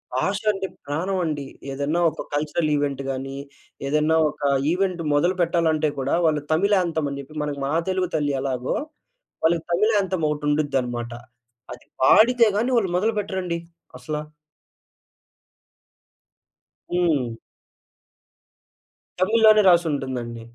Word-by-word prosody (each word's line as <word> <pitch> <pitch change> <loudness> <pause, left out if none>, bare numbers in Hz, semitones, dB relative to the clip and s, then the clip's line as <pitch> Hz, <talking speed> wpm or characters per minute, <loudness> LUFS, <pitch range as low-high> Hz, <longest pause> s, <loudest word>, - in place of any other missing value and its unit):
భాష 195 +10 0
అంటే 195 -1 -4 0.2
ప్రాణం 175 +7 -2
అండి. 145 -3 -3 0.3
ఏదైనా 145 +5 -1
ఒక - - -7
కల్చరల్ 155 +2 0
ఈవెంట్ 140 -2 -1
గానీ, 135 +1 -5 0.5
ఏదైనా 150 +2 +2
ఒక 150 - -12 0.3
ఈవెంట్ 180 -1 0
మొదలుపెట్టాలంటే 165 -1 +2
కూడా, 135 +4 0
వాళ్ళు 155 -2 +2
తమిళ్ 200 +6 +3
యాంతెం 160 -4 -1
అని 140 - -5
చెప్పి, 140 +3 -14
మనకు 145 -1 -4
మా 140 - -2 0.2
తెలుగు 185 -1 0
తల్లి 145 -2 0
ఎలాగో, 130 -2 -2 0.7
వాళ్ళకి 165 0 +2
తమిళ్ 215 +5 +2
యాంతెం 190 -4 -1
ఒకటి 150 0 -3
ఉండుదన్నమాట. 125 -5 -1 0.6
అది 125 - -14 0.2
పాడితే 235 - +6
గాని 240 +4 0
వాళ్ళు 195 -6 +1
మొదలుపెట్టరండి 190 -4 -1 0.4
అసలా! 150 -1 -4 2.7
హ్మ్. 150 -10 +1 1.8
తమిళ్‌లోనే 215 +2 +5
రాసుంటుందండి. 135 -9 0
155 Hz, 110 wpm, -23 LUFS, 140-185 Hz, 2.7 s, పాడితే